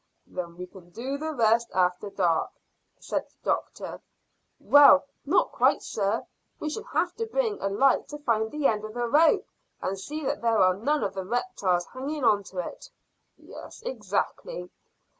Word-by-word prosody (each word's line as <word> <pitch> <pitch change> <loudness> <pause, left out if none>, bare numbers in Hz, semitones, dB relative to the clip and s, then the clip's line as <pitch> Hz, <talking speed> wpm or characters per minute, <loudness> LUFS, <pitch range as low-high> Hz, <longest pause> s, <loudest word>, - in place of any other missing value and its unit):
"Then 170 -2 -6
we 180 - -5
can 180 -1 -15
do 255 +9 -4
the 315 +1 -3
rest 235 -3 +2
after 180 +2 +1
dark," 175 -5 +1 0.5
said - - -3
the - - -34
doctor. - - -3 0.6
"Well, 285 -1 +7 0.2
not 355 - +3
quite, - - +2
sir. 205 +2 -1 0.3
We 305 - -3
shall 435 +6 -5
have 355 -7 0
to 455 0 -2
bring 450 -2 -1
a 195 - 0
light 260 +7 +3
to 295 - -7
find 225 -6 0
the 300 +1 -4
end 215 -4 +2
of 215 +1 -7
the 240 0 -1
rope 305 +6 +4 0.3
and 195 +1 -3
see 300 +8 -5
that - - -1
there 230 -1 +2
are 185 -2 +5
none 285 +11 0
of - - -2
the 190 - -4
reptiles 190 - 0
hanging 280 +3 -5
on 210 -3 +4
to 190 - -12
it." - - -11 0.5
"Yes, - - -12
exactly." - - -3
235 Hz, 175 wpm, -27 LUFS, 195-300 Hz, 0.6 s, Well